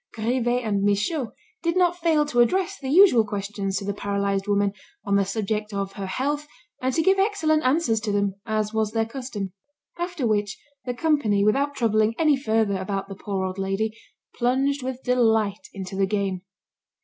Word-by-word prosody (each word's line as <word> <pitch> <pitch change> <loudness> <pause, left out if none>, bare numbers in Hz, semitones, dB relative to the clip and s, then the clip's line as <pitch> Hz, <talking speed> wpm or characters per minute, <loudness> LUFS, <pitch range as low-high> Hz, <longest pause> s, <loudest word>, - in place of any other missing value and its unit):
Grivet 240 +2 0
and 205 -3 0
Michaud 210 - 0 0.3
did 335 +1 0
not 350 -1 +3
fail 320 -3 +3
to 250 -5 -1
address 375 +10 +2
the 265 - -5
usual 325 - +6
questions 200 -1 -3
to 195 - -4
the 200 - -1
paralysed 200 -1 -1
woman, 200 -1 +2 0.3
on 200 -1 +1
the 200 -1 +3
subject 210 +1 -2
of 195 -1 -2
her 195 -1 -5
health, 290 +8 -2 0.3
and 260 +1 +1
to 325 - +2
give 385 +2 +4
excellent 385 -7 +2
answers 255 -3 +2
to 215 -1 -2
them, 200 -1 +1
as 215 -1 -1
was 220 -1 0
their 225 -1 +1
custom. 230 -6 -5 0.5
After 345 -6 -2
which, 210 -2 0 0.3
the 245 -1 -3
company, 245 -9 +2
without 280 +7 +2
troubling 220 -2 +2
any 310 -3 +4
further 220 -6 +1
about 195 +1 -3
the 195 - -6
poor 190 -1 -3
old 185 +1 -4
lady, 195 +3 -1 0.4
plunged 270 +3 +1
with 255 0 -5
delight 225 -5 +2
into 190 -1 -7
the 195 0 +1
game. 195 -2 -1
220 Hz, 180 wpm, -24 LUFS, 200-275 Hz, 0.5 s, usual